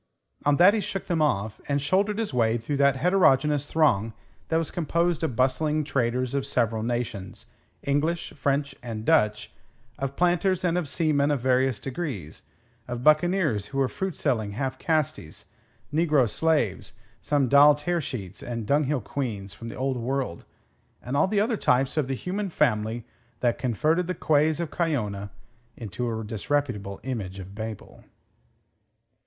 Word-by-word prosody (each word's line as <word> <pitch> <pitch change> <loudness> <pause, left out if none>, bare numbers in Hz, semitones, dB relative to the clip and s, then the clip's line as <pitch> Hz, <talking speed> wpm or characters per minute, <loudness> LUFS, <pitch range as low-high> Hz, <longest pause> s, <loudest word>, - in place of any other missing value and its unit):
On 145 - +5
that 185 +4 +7
he 220 - +1
shook 195 -2 -4
them 170 -3 0
off, 110 -7 0
and 140 0 +1
shouldered 195 +8 +1
his 225 -9 -2
way 115 -2 +2
through 130 +5 -3
that 140 -1 +4
heterogeneous 150 -3 +3
throng 115 -9 +2 0.3
that 160 - +1
was 165 -1 -1
composed 170 0 0
of 135 -7 -1
bustling 150 +5 +1
traders 125 -2 -1
of 140 -1 0
several 115 -5 0
nations 115 -5 -4 0.4
English, 155 +5 -1
French, 140 0 -1
and 115 -3 -6
Dutch 105 -10 +2 0.5
of 135 0 -3
planters 180 +1 +2
and 170 -1 +2
of 175 -6 -1
seamen 145 -1 +1
of 145 -2 +1
various 130 -2 +2
degrees, 130 - -5 0.5
of 120 0 -5
buccaneers 155 - +3
who 135 - -6
were 135 -1 +3
fruit 190 +4 -4
selling 110 -9 -1
half 130 +4 -3
castes, 155 - -2 0.5
negro 150 -5 +3
slaves, 150 - 0 0.3
some 145 -3 +1
doll 145 +3 +7
tearsheets 145 - -4
and 115 -2 -4
dunghill 145 +1 +1
queans 105 -7 -4
from 115 +7 -8
the - - -8
Old 130 0 -1
World, 125 -6 -3 0.6
and 125 +3 -3
all 145 - +4
the 205 +1 +1
other 220 +2 +1
types 130 -2 +2
of 150 -4 +1
the 135 - -1
human 195 +8 -3
family 110 -5 0 0.4
that 120 -2 +1
converted 155 - +1
the 185 - -2
quays 155 +1 +2
of 170 -3 -3
Cayona 105 - -1 0.5
into 120 +2 -4
a - - -5
disreputable 110 -2 -2
image 105 -8 -4
of 95 0 -9
Babel. 110 0 -7
135 Hz, 155 wpm, -26 LUFS, 115-160 Hz, 0.6 s, that